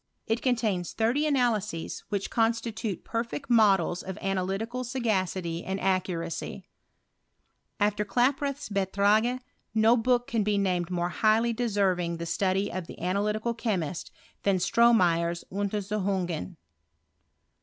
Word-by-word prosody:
It 225 +2 -1
contains 220 -8 0
thirty 245 +7 +1
analyses, 220 - 0
which 200 -1 -2
constitute 225 -3 -1
perfect 235 +4 -4
models 195 -6 +4
of' 190 +1 -6
analytical 195 +6 -2
sao^city 190 -9 -1
and 190 +1 -3
accuracy. 180 -3 -2 1.1
After 210 0 +2
Rlaproth's 275 +5 0
Beitrage, 205 +5 +2 0.3
no 220 +2 +5
book 245 +1 +2
can 230 -2 0
be 205 0 +1
named 180 -3 0
more 175 -1 -1
highly 225 +4 +2
do 240 +1 -1
Berving 180 -4 +1
the 170 - -5
study 190 +3 0
of 185 -3 -5
the - - -10
analytical 210 +5 0
cliemiat 185 -8 -2 0.3
than 200 -2 +2
Stromeyer's 175 -6 +3
Untersuchungeu 195 -3 -2
205 Hz, 115 wpm, -28 LUFS, 185-230 Hz, 1.1 s, no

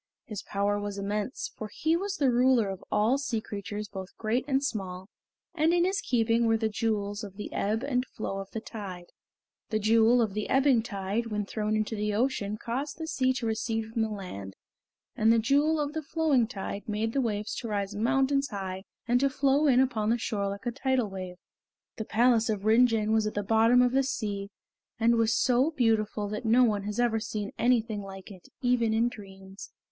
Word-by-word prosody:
His 210 -3 -6
power 205 0 -1
was 205 -1 -4
immense, 205 +5 -3
for 215 - -6
he 320 +8 +1
was 390 +3 -2
the 270 -3 +3
ruler 245 -3 +3
of 195 0 -6
all 220 +6 +2
sea 265 -5 -1
creatures 205 0 -6
both 190 -1 -9
great 230 +3 0
and 270 -1 +1
small, 190 -6 -4 0.4
and 330 +1 +2
in 350 0 +3
his 390 +2 0
keeping 230 -1 +2
were 225 0 +3
the 220 0 0
Jewels 205 -1 -2
of 200 -2 -8
the 210 - -6
Ebb 215 +4 -1
and 250 -3 0
Flow 195 -2 -5
of 195 0 -7
the 225 - -5
Tide. 195 -6 -8 0.6
The 215 - 0
Jewel 225 +3 +4
of 220 -4 +1
the 210 0 -3
Ebbing 270 -3 +4
Tide 205 +1 -3
when 210 -2 -2
thrown 215 +1 -2
into 215 +1 -1
the 210 0 -1
ocean 215 -3 0
caused 265 +7 -4
the 325 - -4
sea 260 -5 +1
to 250 -2 -4
recede 225 0 -2
from 230 - 0
the 220 - 0
land, 140 - -7 0.6
and 220 +1 +4
the 230 - +5
Jewel 290 +7 +2
of 295 0 -2
the 315 - -2
Flowing 300 -6 +1
Tide 200 -1 -6
made 220 +2 -1
the 275 - +1
waves 210 -3 -2
to 235 - -4
rise 205 -2 -2
mountains 270 +5 +1
high 190 -2 -5 0.2
and 245 +1 +3
to 275 +1 +3
flow 280 +1 +2
in 255 -3 +5
upon 225 -5 +1
the 235 - +3
shore 205 -3 -2
like 200 +3 -7
a 240 - 0
tidal 260 -4 0
wave. 185 -2 -6 0.6
The 220 - -4
palace 230 0 +3
of 210 -2 -2
Rin 230 +3 +6
Jin 220 -2 0
was 220 -1 +2
at 215 - -5
the 205 - -1
bottom 225 +4 +4
of 245 - +2
the 270 +1 +3
sea, 205 -7 -3 0.5
and 235 +1 +4
was 225 -1 +2
so 255 +4 +3
beautiful 220 -7 0
that 210 +2 -4
no 235 +3 +5
one 205 -4 +1
has 210 +2 -3
ever 235 -2 +2
seen 210 -1 -4
anything 230 -3 +2
like 195 0 -10
it 180 -4 -13
even 240 -3 +2
in 230 +2 +3
dreams. 195 -3 -10
220 Hz, 210 wpm, -28 LUFS, 205-250 Hz, 0.6 s, Rin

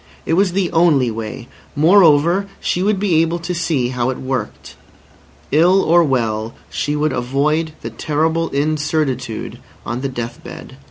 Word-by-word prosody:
It - - -1
was 185 +1 +2
the 190 -2 0
only 160 -8 +3
way. 110 +2 -6 0.3
Moreover, 170 +2 +4
she 180 - -1
would 200 0 +1
be 180 -6 +2
able 165 +1 0
to 170 +1 -4
see 160 -8 -1
how 125 -1 -1
it 130 - -3
worked. 130 -5 -5 0.8
Ill 180 +6 +4
or 170 +1 +4
well 115 -6 -1 0.2
she 145 +1 -2
would 150 0 0
avoid 145 +6 0
the - - -7
horrible 160 +2 +1
incertitude 145 -5 -2 0.3
on 120 +3 -3
the 135 - -2
death 120 -2 -6
bed. - - -10
150 Hz, 155 wpm, -18 LUFS, 130-170 Hz, 0.8 s, Moreover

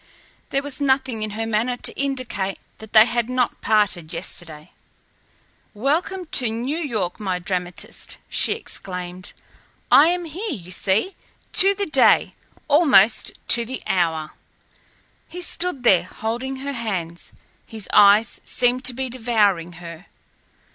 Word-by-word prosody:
There 275 0 0
was 285 0 -6
nothing 265 -4 +1
in 215 - -2
her 225 - -2
manner 225 +3 0
to - - -5
indicate 255 -8 -2 0.2
that 220 0 -12
they 215 0 +8
had 240 0 -1
not 255 -1 -1
parted 200 -7 +1
yesterday. 155 -3 -5 1.0
"Welcome 335 - -1
to 245 -4 +3
New 245 +8 -3
York, 220 - -3
my 190 -4 -2
dramatist!" 180 0 -5
she - - 0
exclaimed. 180 -1 -6 0.6
"I 295 - +8
am 350 0 0
here, 360 +5 -4
you 180 +1 -12
see, 200 - +1 0.4
to 395 +1 +5
the 405 0 -2
day, 275 -6 +4 0.4
almost 285 - +4 0.2
to 235 - +4
the 255 +3 -7
hour." 160 -4 0 1.0
He 360 - -8
stood 350 -5 -2
there, 185 -7 +4
holding 235 +7 -4
her 280 +2 -5
hands. 185 -8 -4 0.4
His 220 -3 -7
eyes 210 +2 +5
seemed 250 +1 +1
to 255 - +3
be 260 +2 -3
devouring 215 -8 0
her. 170 +1 -11
230 Hz, 135 wpm, -22 LUFS, 190-270 Hz, 1.0 s, they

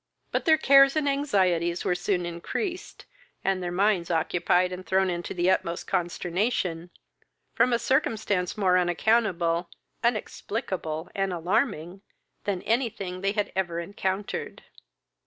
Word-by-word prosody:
But - - -1
their 320 -2 +6
cares 275 -1 +6
and 305 -2 +1
anxieties 185 - +1
were - - +2
soon 180 0 -1
increased, 255 - -5 0.4
and 195 -1 0
their 175 -1 -3
minds 190 -1 +1
occupied 175 +2 +1
and 180 0 -6
thrown 190 0 +1
into 175 0 -4
the 180 +1 +3
utmost 170 -2 -1
consternation, 175 0 -1 0.6
from 250 - +3
a 235 - +3
circumstance 215 -8 0
more 185 -3 +3
unaccountable, 175 -2 +1 0.3
inexplicable, 200 -7 -2
and 195 -1 -1
alarming, 180 - -1 0.4
than 195 -3 -2
anything 220 -6 -1
they 195 +1 0
had 210 -1 -1
ever 175 -3 -1
encountered. 190 +2 -4
185 Hz, 125 wpm, -26 LUFS, 175-215 Hz, 0.6 s, their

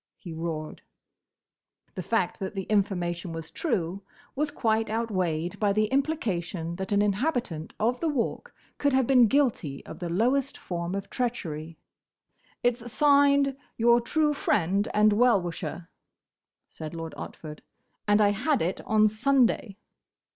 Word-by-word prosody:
he 175 -7 -9
roared. 160 -1 -5 1.1
The - - -5
fact - - -1
that 195 +1 -5
the 195 - -2
information 180 -4 -1
was 165 0 -7
true 190 - -2 0.3
was 295 +2 0
quite 225 -6 0
outweighed 185 -7 -1
by 205 -2 +2
the 215 +1 +2
implication 190 - -1
that 190 +1 -5
an 205 0 +3
inhabitant 210 - -1
of 240 +3 +1
the 330 - 0
Walk 270 -6 -2 0.3
could 285 -1 +2
have 260 -1 +3
been 250 -2 +6
guilty 215 - 0
of - - -9
the 175 - -4
lowest 255 +9 +1
form 175 +1 -4
of 200 0 -5
treachery. 165 - -3 0.9
"It's 240 -1 0
signed, 280 -1 +4 0.2
'Your 235 +1 +4
true 300 +5 +1
Friend 200 - +1
and 210 0 +4
Well 235 -1 +4
wisher,'" 170 -1 -5 0.8
said 155 +1 -8
Lord 165 -1 -6
Otford, 150 -1 -8 0.5
"and 205 +1 +4
I 205 - +5
had 250 - +1
it 175 +3 -2
on 215 0 +4
Sunday." 235 -2 +1
210 Hz, 140 wpm, -27 LUFS, 175-250 Hz, 1.1 s, been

